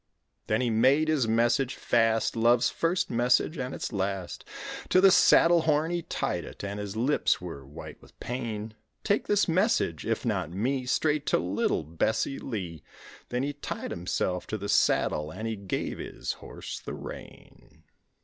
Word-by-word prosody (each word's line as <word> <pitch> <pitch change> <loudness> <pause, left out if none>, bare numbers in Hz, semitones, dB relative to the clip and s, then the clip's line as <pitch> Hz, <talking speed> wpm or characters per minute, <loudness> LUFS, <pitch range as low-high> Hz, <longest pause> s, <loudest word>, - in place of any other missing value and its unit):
Then 110 - +1
he 120 -2 +1
made 135 +8 +4
his 145 -7 +2
message 120 +4 +2
fast, 115 -1 +1
Love's 120 +2 +3
first 180 0 0
message 125 +6 +2
and 125 0 -3
its - - -5
last, 95 -2 -3 0.5
To 185 - +5
the 195 0 +7
saddle 170 -1 +6
horn 155 +1 +1
he 175 0 -1
tied - - -2
it - - -10
and 100 +1 -4
his 105 0 -5
lips 125 +7 +2
were 80 -6 -8
white 75 +4 -10
with - - -20
pain, 110 -3 -4 0.3
"Take 205 0 +1
this 205 0 +3
message, 180 - +1
if 115 +1 -2
not 95 -8 -1
me, 125 +8 -1
Straight 150 +2 +1
to - - +3
little 90 -2 0
Bessie 85 - -1
Lee;" 90 - -5 0.5
Then 125 +1 -1
he 145 +1 -2
tied 145 - -5
himself 90 +1 -2
to 110 - -3
the 100 0 -5
saddle, 75 0 +2
and 110 +8 -5
he 110 - -2
gave 100 -2 -4
his - - -4
horse - - -8
the - - -7
rein. - - -11
115 Hz, 170 wpm, -28 LUFS, 100-145 Hz, 0.5 s, the